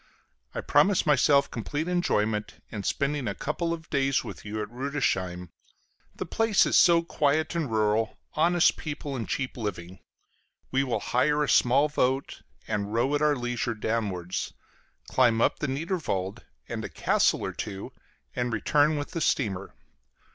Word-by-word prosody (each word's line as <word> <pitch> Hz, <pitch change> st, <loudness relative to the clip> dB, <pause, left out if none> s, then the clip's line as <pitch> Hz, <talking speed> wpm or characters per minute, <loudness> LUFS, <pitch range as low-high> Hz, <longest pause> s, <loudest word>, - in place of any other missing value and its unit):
I -, -, -2 dB
promise 200 Hz, -2 st, +3 dB
myself 140 Hz, -1 st, +4 dB
complete 145 Hz, +8 st, -3 dB
enjoyment 110 Hz, -12 st, 0 dB, 0.2 s
in 105 Hz, -, -4 dB
spending 140 Hz, +4 st, -1 dB
a 100 Hz, -, -2 dB
couple 165 Hz, +6 st, -2 dB
of 160 Hz, -1 st, -5 dB
days 135 Hz, -2 st, +1 dB
with -, -, -8 dB
you 105 Hz, +1 st, -5 dB
at -, -, -8 dB
Rüdesheim; 105 Hz, -9 st, -2 dB, 0.7 s
the -, -, -4 dB
place 225 Hz, -3 st, +3 dB
is -, -, +1 dB
so 170 Hz, -1 st, +6 dB
quiet 155 Hz, -1 st, +1 dB
and 165 Hz, -6 st, -1 dB
rural, 110 Hz, 0 st, +1 dB, 0.2 s
honest 170 Hz, +2 st, +3 dB
people 145 Hz, -2 st, -5 dB
and 115 Hz, -4 st, -4 dB
cheap 135 Hz, -2 st, -2 dB
living. 95 Hz, -5 st, -5 dB, 0.7 s
We 135 Hz, +1 st, +2 dB
will 130 Hz, -3 st, -1 dB
hire 150 Hz, +4 st, +2 dB
a -, -, -1 dB
small 135 Hz, +4 st, +4 dB
boat 135 Hz, -2 st, -1 dB, 0.3 s
and 105 Hz, 0 st, -2 dB
row 120 Hz, +5 st, +1 dB
at 145 Hz, -, +1 dB
our 150 Hz, -1 st, +3 dB
leisure 120 Hz, -2 st, -2 dB
downwards, 105 Hz, -5 st, -2 dB, 0.5 s
climb 120 Hz, -3 st, +3 dB
up -, -, +2 dB
the 150 Hz, -, -1 dB
Niederwald 135 Hz, -, -3 dB, 0.2 s
and -, -, -4 dB
a -, -, -5 dB
castle -, -, +1 dB
or -, -, -4 dB
two, 100 Hz, -3 st, -6 dB, 0.4 s
and 125 Hz, -1 st, -1 dB
return 145 Hz, +8 st, +2 dB
with 145 Hz, -, -4 dB
the 165 Hz, -, -3 dB
steamer. 100 Hz, -9 st, -1 dB
130 Hz, 155 wpm, -27 LUFS, 110-150 Hz, 0.7 s, so